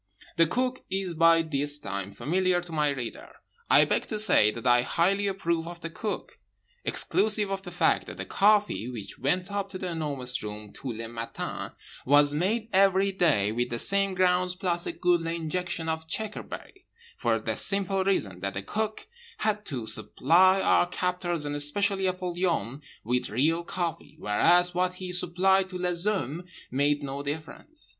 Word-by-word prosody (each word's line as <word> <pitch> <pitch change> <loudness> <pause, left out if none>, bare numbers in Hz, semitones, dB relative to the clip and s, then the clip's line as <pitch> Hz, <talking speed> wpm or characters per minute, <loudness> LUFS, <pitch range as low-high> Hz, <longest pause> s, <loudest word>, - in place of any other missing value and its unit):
The 165 - +4
Cook 255 +7 -1
is 190 -2 -1
by 165 0 +5
this 145 -2 0
time 100 -7 -5
familiar 175 - 0
to 175 -1 -9
my 150 -2 +1
reader. 130 -5 -5 0.4
I - - +7
beg - - 0
to 215 - -3
say 210 - +5
that 115 +3 -7
I 120 -1 +5
highly 195 +9 +1
approve 170 -4 -1
of 175 0 -8
The 165 - -5
Cook; 210 +5 -5 0.4
exclusive 210 -2 +1
of 195 0 -2
the 185 - -8
fact 175 - +1
that - - -8
the - - -5
coffee, 205 - +2
which 115 -5 -7
went 180 +9 0
up 200 -1 -2
to 190 - -6
The 185 -1 -4
Enormous 140 -6 0
Room 105 0 -8
tous 135 -4 -6
les 115 - -5
matins, 115 0 -6 0.3
was 145 +1 +4
made 215 +8 0
every 195 0 +4
day 150 - +2
with 120 +2 -1
the 120 - -3
same 195 +6 +2
grounds 180 0 +2
plus 175 -2 -1
a - - -1
goodly 170 -2 0
injection 170 0 -3
of 160 0 -3
checkerberry—for 385 - -5
the - - -3
simple 195 -1 +1
reason 105 - -1
that 100 +1 -4
the 95 - -4
Cook 215 - -3 0.3
had 210 -1 -1
to 125 -5 -4
supply 165 - +3
our 175 - +3
captors 180 -3 -1
and 145 0 -3
especially 190 +7 +1
Apollyon 175 - -2 0.2
with 125 +3 -1
real 155 +10 +1
coffee, 170 -4 -4
whereas 175 +11 +3
what 180 0 0
he 185 0 -6
supplied 185 +2 +2
to 185 - -6
les 180 -1 -2
hommes 180 - -2 0.2
made 145 +3 +1
no 140 0 -4
difference. 155 - -2
175 Hz, 170 wpm, -27 LUFS, 140-190 Hz, 0.4 s, I